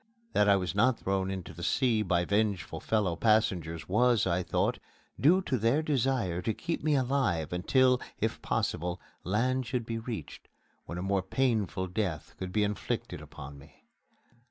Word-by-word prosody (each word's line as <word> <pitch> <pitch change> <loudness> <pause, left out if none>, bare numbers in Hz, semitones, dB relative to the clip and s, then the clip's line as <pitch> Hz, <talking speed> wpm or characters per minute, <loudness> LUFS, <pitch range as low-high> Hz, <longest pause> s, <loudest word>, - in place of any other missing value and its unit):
That 105 0 +4
I 100 - +7
was 90 -4 -1
not 130 0 +3
thrown 95 0 -1
into 95 -2 -5
the - - -10
sea 120 -5 +2
by 90 -3 +1
vengeful 100 -2 0
fellow 105 -6 0
passengers 90 -6 +1
was, 115 +2 +3
I 90 -1 +1
thought, - - 0 0.4
due 180 +7 +5
to 130 -7 -1
their 120 +8 +2
desire 130 - 0
to 110 +4 -1
keep 165 -3 -3
me 155 -1 +3
alive 125 - 0
until, 125 +8 +3 0.2
if - - -1
possible, 90 +2 -1 0.2
land 125 +6 0
should 125 -3 -2
be 115 0 -3
reached, 115 - -7 0.4
when 85 - -5
a 90 - -3
more 95 0 +1
painful 105 -3 0
death 90 -4 -3
could 95 -1 -4
be 105 +2 +2
inflicted 105 0 -3
upon 70 +1 -10
me. 70 - -18
105 Hz, 165 wpm, -30 LUFS, 90-125 Hz, 0.4 s, I